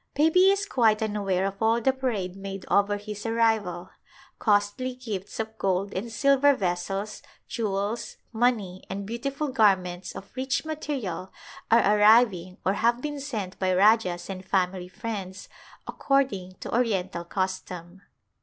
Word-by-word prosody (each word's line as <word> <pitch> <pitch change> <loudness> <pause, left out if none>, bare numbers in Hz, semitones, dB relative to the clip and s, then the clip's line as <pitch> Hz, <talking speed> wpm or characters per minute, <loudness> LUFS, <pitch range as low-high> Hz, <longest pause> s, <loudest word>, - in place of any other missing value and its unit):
Baby 325 +6 +5
is 400 +1 +2
quite 225 - +2
unaware 200 -3 0
of 195 +1 -4
all 225 +1 +3
the 265 +3 +2
parade 220 -9 -2
made 195 -1 -7
over 205 0 +3
his 205 0 -7
arrival. 220 -6 0 0.5
Costly 210 +4 +1
gifts 215 -7 -6
of 220 0 -4
gold 195 +1 0
and 220 +5 -4
silver 275 +3 +4
vessels, 195 +2 -3 0.3
jewels, 210 +1 -3 0.2
money, 220 -6 0
and 200 +1 -4
beautiful 275 +7 -3
garments 190 -7 +1
of 195 - -10
rich 265 +3 -1
material 270 - -4 0.4
are 210 -2 +5
arriving 210 -5 +4
or 190 - +3
have 235 +3 +2
been 290 +2 -4
sent 220 -10 -5
by 185 -1 +1
rajahs 195 -3 +3
and 190 -1 -6
family 185 -1 0
friends, 195 -2 -6 0.4
according 255 -10 0
to - - -6
orien 210 -6 0
tal 170 - -5
custom. 185 0 -4
205 Hz, 140 wpm, -26 LUFS, 190-240 Hz, 0.5 s, Baby